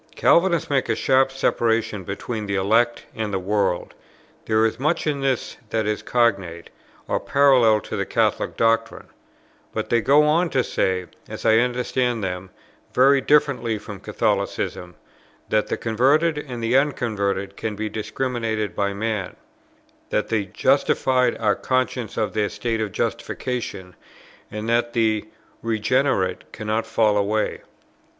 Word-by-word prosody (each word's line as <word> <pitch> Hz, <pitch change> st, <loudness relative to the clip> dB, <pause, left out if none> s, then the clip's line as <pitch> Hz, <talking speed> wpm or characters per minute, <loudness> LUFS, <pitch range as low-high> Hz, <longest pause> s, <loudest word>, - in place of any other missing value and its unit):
Calvinists 170 Hz, -2 st, +3 dB
make 140 Hz, -2 st, 0 dB
a -, -, +2 dB
sharp 135 Hz, 0 st, +3 dB
separation 115 Hz, -6 st, 0 dB
between 105 Hz, +3 st, -5 dB
the 100 Hz, -, -1 dB
elect 115 Hz, +5 st, +2 dB
and 110 Hz, -2 st, -3 dB
the 95 Hz, -, 0 dB
world; 95 Hz, -1 st, -1 dB, 0.5 s
there 110 Hz, 0 st, +3 dB
is 115 Hz, +1 st, -1 dB
much 155 Hz, +5 st, 0 dB
in 145 Hz, -3 st, -1 dB
this 135 Hz, -3 st, -1 dB
that 110 Hz, 0 st, 0 dB
is 105 Hz, 0 st, -1 dB
cognate 100 Hz, -9 st, 0 dB, 0.4 s
or -, -, 0 dB
parallel 130 Hz, -6 st, +4 dB
to -, -, -7 dB
the -, -, -1 dB
Catholic -, -, 0 dB
doctrine; 115 Hz, 0 st, 0 dB, 0.6 s
but -, -, -4 dB
they 120 Hz, -1 st, +3 dB
go 145 Hz, +5 st, +5 dB
on 165 Hz, +4 st, +2 dB
to 130 Hz, -4 st, +1 dB
say, 90 Hz, -1 st, -1 dB, 0.2 s
as -, -, -7 dB
I 110 Hz, 0 st, +5 dB
understand 125 Hz, -1 st, 0 dB
them, 90 Hz, 0 st, -4 dB, 0.5 s
very 135 Hz, +2 st, +5 dB
differently 135 Hz, -6 st, +2 dB
from 105 Hz, -1 st, -9 dB
Catholicism, 90 Hz, 0 st, -2 dB, 0.5 s
that 110 Hz, -1 st, +1 dB
the -, -, -2 dB
converted 140 Hz, +9 st, +2 dB
and 130 Hz, -5 st, -6 dB
the 115 Hz, +2 st, +1 dB
unconverted 100 Hz, -8 st, 0 dB
can 110 Hz, -2 st, -4 dB
be 110 Hz, +1 st, -3 dB
discriminated 110 Hz, -2 st, -3 dB
by 100 Hz, 0 st, 0 dB
man, 110 Hz, -1 st, -3 dB, 0.7 s
that -, -, -1 dB
the 110 Hz, -3 st, 0 dB
justified 125 Hz, +5 st, +2 dB
are 105 Hz, -2 st, +2 dB
conscious 130 Hz, -3 st, -2 dB
of 110 Hz, -2 st, -1 dB
their 105 Hz, -1 st, 0 dB
state 115 Hz, -2 st, -2 dB
of 105 Hz, -2 st, -2 dB
justification, 95 Hz, -5 st, -4 dB, 0.5 s
and 105 Hz, +1 st, -5 dB
that 120 Hz, 0 st, +1 dB
the 110 Hz, -2 st, +1 dB, 0.3 s
regenerate 115 Hz, -3 st, 0 dB
cannot 110 Hz, +1 st, -2 dB
fall 105 Hz, -2 st, +2 dB
away. 105 Hz, +2 st, 0 dB
115 Hz, 145 wpm, -22 LUFS, 105-130 Hz, 0.7 s, go